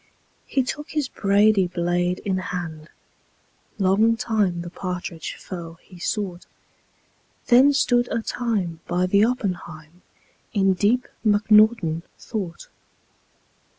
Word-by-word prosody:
He 270 - +1
took 295 +4 -5
his 300 -4 -1
brady 200 -1 +3
blade 175 0 -1
in 190 -2 0
hand; 165 -4 -6 0.9
Long 215 +4 +3
time 205 -7 0
the 175 - -8
partridge 180 -3 -5
foe 170 -3 -8
he 180 -2 -15
sought. 185 -2 -3 1.0
Then 260 +3 +6
stood 245 -3 +2
a 230 - -1
time 205 -11 -2
by 180 +1 +1
the 200 +3 +3
oppenheim 180 -8 -3 0.5
In 195 -2 +3
deep 215 +7 +1 0.2
mcnaughton 210 -5 +4 0.2
thought. 190 -7 -6
195 Hz, 110 wpm, -23 LUFS, 175-220 Hz, 1.0 s, Then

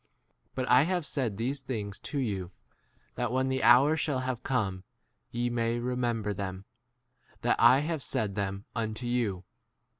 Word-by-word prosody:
But 130 -1 -2
I 125 +1 +6
have 175 +1 0
said 125 -9 -2
these 130 +5 -1
things 105 -6 -4
to 145 - -5
you, 100 -9 -2 0.6
that 120 -1 -2
when 130 +1 +1
the*? 130 0 0
hour 125 +7 +6
shall 145 -4 0
have 130 -2 -3
come 100 -9 -1 0.5
ye 120 +1 -1
may 115 0 0
remember 120 -3 -1
them, 95 -1 -5 0.8
that - - +3
I 135 +2 +7
' 150 - -3
have 160 -4 -2
said 105 -4 -1
[them] 100 0 -3
unto 110 +1 -3
you. 115 -7 -1
120 Hz, 160 wpm, -29 LUFS, 105-130 Hz, 0.8 s, I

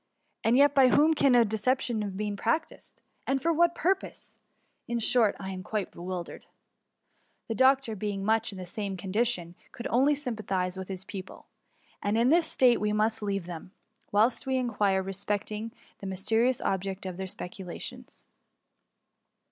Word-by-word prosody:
And 230 +3 +4
yet, 285 0 +5
by 270 -2 +6
whom 300 +5 +5
can 275 -4 +4
a 235 -1 +6
deception 225 +2 0
have 200 -2 -4
been 210 0 -2
practised, 230 +10 -3 0.2
and 270 0 +1
for 335 +4 +1
what 340 +1 +3
purpose? 385 +3 -2 0.5
In 235 - -1
short, 230 -2 +3
I 190 -1 -5
am 185 -1 -6
quite 200 +1 -3
be - - -14
wildered/' 180 0 -6 1.0
The 225 - -2
doctor 260 -1 +3
being 200 -1 -3
much 220 +1 +2
in 195 - -9
the 185 - -6
same 195 +1 -4
condition, 190 -2 -1 0.2
could 235 - -9
only 270 +5 +4
sympathize 210 -9 -2
with 190 -1 -6
his 190 -1 -6
pupil; 190 -3 -9 0.6
and 205 +2 0
in 235 +2 +4
this 335 +2 +4
state 245 -4 +4
we 210 0 +1
must 215 +1 +1
leave 195 -3 -2
them, 175 +2 -8 0.4
whilst 220 +6 +2
we 265 0 +1
inquire 205 -6 +1
respecting 205 +3 -3 0.3
the 195 - -6
mysterious 225 +6 +1
object 195 0 -2
of 185 -2 -5
their 190 0 -4
specu 190 -1 -7
lations. 180 - -9
215 Hz, 165 wpm, -28 LUFS, 190-245 Hz, 1.0 s, by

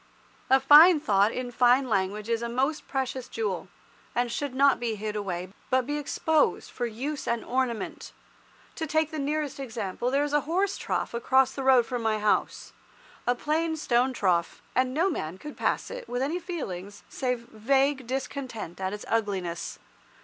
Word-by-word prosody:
A 265 - +6
fine 300 +5 +8
thought 205 -6 +3
in 250 0 -4
fine 250 +2 +4
language 205 0 -1
is 230 0 0
a 235 - -3
most 270 +6 -1
precious 265 -2 -3
jewel, 200 -5 -3 0.5
and 240 0 +1
should 275 +1 -3
not 275 0 +4
be 235 -2 -1
hid 210 0 -4
away, 185 -3 -3 0.2
but 260 -1 +2
be 295 +2 -2
exposed 310 +1 +1
for 245 - -2
use 270 +7 -4
and 235 -1 -1
ornament. 250 -2 -2 0.7
To 320 - -2
take 315 +1 +1
the 310 - -4
nearest 295 0 -2
example, 230 -3 -3
there 280 +2 +2
is 295 0 -3
a 295 - +4
horse 385 +4 +1
trough - - -2
across 260 +2 +3
the 275 - -5
road 260 -3 +5
from 245 -1 -3
my 220 -1 +1
house, 210 0 0 0.5
a 245 - +3
plain 320 +4 -1
stone 255 -3 +2
trough, 180 -8 0
and 255 0 +2
no 320 +8 +2
man 180 - -3
could 300 +8 -9
pass - - -1
it - - -7
with 245 +1 -1
any 320 +6 -1
feelings 205 - -6
save 250 -3 -2
vague 265 +3 +1
discontent 255 - -5
at 190 +1 -2
its 210 - -7
ugliness. 195 -6 -2
255 Hz, 175 wpm, -27 LUFS, 220-285 Hz, 0.7 s, fine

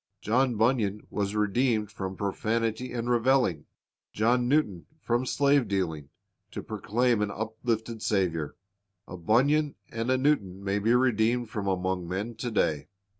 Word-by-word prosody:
John 125 +3 +1
Bunyan 110 -3 +1
was 100 0 -2
redeemed 105 0 +1
from 95 -2 -5
profanity 110 +4 -1
and 120 -1 -3
reveling, 120 - +2 0.5
John 120 +3 +2
Newton 125 - +1
from 120 -1 -1
slave 140 -1 +3
dealing, 80 -7 -2 0.4
to - - -7
proclaim 120 0 0
an 105 - 0
uplifted 110 +1 -3
Saviour. 85 -9 0 0.5
A - - -7
Bunyan 140 - +2 0.2
and 115 +2 -3
a 130 - +3
Newton 105 -10 0
may 100 +1 0
be 115 +4 +3
redeemed 120 -1 +2
from 100 -2 -3
among 95 -1 -1
men 100 +6 -3
to 125 - -3
day. 80 -9 0
110 Hz, 140 wpm, -28 LUFS, 100-125 Hz, 0.5 s, slave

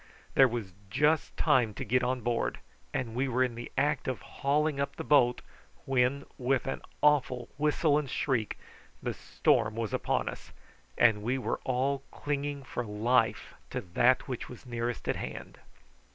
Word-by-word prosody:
There 135 - +7
was 115 -6 -4 0.2
just 150 +8 +2
time 115 -5 +3
to 135 - -4
get 125 +3 +2
on 125 0 0
board, 120 +1 0 0.3
and 115 - -2
we 130 +3 0
were 130 0 +2
in 125 -2 -1
the 120 +1 -7
act 145 -1 +1
of 130 - -1
hauling 145 +1 0
up 140 0 -1
the - - -5
boat, 125 -5 +4 0.4
when, 135 +1 +1
with 130 0 +1
an 135 - -3 0.2
awful 130 -5 +3
whistle 150 0 +3
and 145 -3 -5
shriek, 125 -5 -1 0.5
the - - -1
storm 105 0 +1
was 115 -2 -3
upon - - 0
us, - - -7 0.4
and 110 -3 +5
we 120 +5 0
were 130 - -2
all 135 +2 0
clinging 145 -1 -3
for 125 -1 -4
life 115 +2 +1 0.2
to - - -2
that 120 +10 +2
which 125 -3 -5
was 125 +1 -11
nearest 120 -1 -3
at - - +1
hand. - - -7
125 Hz, 165 wpm, -30 LUFS, 120-140 Hz, 0.5 s, There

